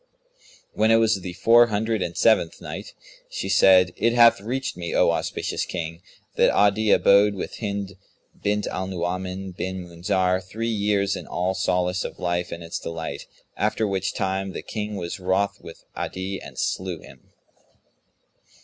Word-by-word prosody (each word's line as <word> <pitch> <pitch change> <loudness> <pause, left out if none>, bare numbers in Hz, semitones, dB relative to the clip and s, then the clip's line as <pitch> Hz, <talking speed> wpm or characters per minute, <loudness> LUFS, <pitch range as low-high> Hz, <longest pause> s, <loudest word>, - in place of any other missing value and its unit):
When 110 +1 +2
it 115 - +6
was 110 -3 +3
the 90 -1 -6
Four 115 +5 +5
Hundred 110 0 -1
and 85 - -3
Seventh 110 -7 +3
Night, - - -8 0.3
She 95 - -4
said, 90 -3 +5
It 115 - +2
hath 115 -4 +6
reached 130 +5 -3
me, 85 -1 -4
O - - +4
auspicious - - -2
King, 85 -1 -5 0.4
that - - +5
Adi 105 +1 +3
abode 100 +1 +5
with 95 - -6
Hind 100 -3 -4 0.4
bint 105 0 0
Al 95 0 -3
Nu'uman 95 +1 -3
bin 95 0 -5
Munzir 90 +2 0
three 110 +5 -4
years 100 -2 +1
in - - -8
all 90 +2 -1
solace 90 -1 0
of - - -6
life 85 0 -2
and 85 0 -6
its 85 - -5
delight, 85 -1 -6 0.3
after 110 +1 0
which 95 -1 -2
time 95 0 -2
the - - -6
King 105 -1 -4
was 85 0 -5
wroth 100 +2 0
with 80 - -12
Adi 95 +1 -4
and - - -11
slew 90 -3 -2
him. 65 -1 -16
95 Hz, 160 wpm, -24 LUFS, 90-105 Hz, 0.4 s, it